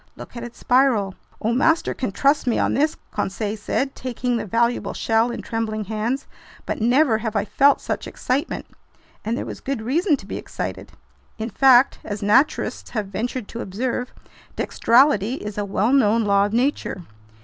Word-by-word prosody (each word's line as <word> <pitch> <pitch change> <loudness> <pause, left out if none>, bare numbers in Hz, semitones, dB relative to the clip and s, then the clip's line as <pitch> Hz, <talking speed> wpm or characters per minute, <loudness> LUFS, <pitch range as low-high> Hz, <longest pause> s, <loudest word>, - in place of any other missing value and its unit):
"Look - - -11
at 235 - -6
its 240 0 -9
spiral!" 245 -7 +2 0.3
"Oh, 225 +2 0
master 320 +6 +2
can 255 - -3
trust 280 +6 +2
me 240 - +2
on - - +1
this," 305 +3 +1
Conseil 205 +1 -2
said, 265 +5 -2
taking 250 -1 -2
the 225 - -3
valuable 235 +4 0
shell 225 +1 +2
in 240 - -5
trembling 220 -2 -2
hands, 220 +6 -2 0.4
"but - - -3
never 245 0 +3
have 220 -1 -4
I 205 0 +1
felt 280 +5 +4
such - - -3
excitement!" 275 +7 -2 0.6
And 225 +3 -1
there - - -3
was - - -7
good 270 -2 -3
reason 295 - +1
to - - -13
be - - -5
excited! - - -6 0.4
In 225 +1 -4
fact, 265 -1 +5
as 205 -1 -5
naturalists 215 +9 +2
have 210 -4 -3
ventured 235 +3 -3
to 235 - -6
observe, 245 +5 -3 0.5
"dextrality" 245 -2 +3
is 210 -4 -6
a 205 - -1
well 205 +5 +1
known 230 -4 +4
law 200 -1 +3
of - - -7
nature. 240 -6 0
235 Hz, 175 wpm, -22 LUFS, 215-260 Hz, 0.6 s, fact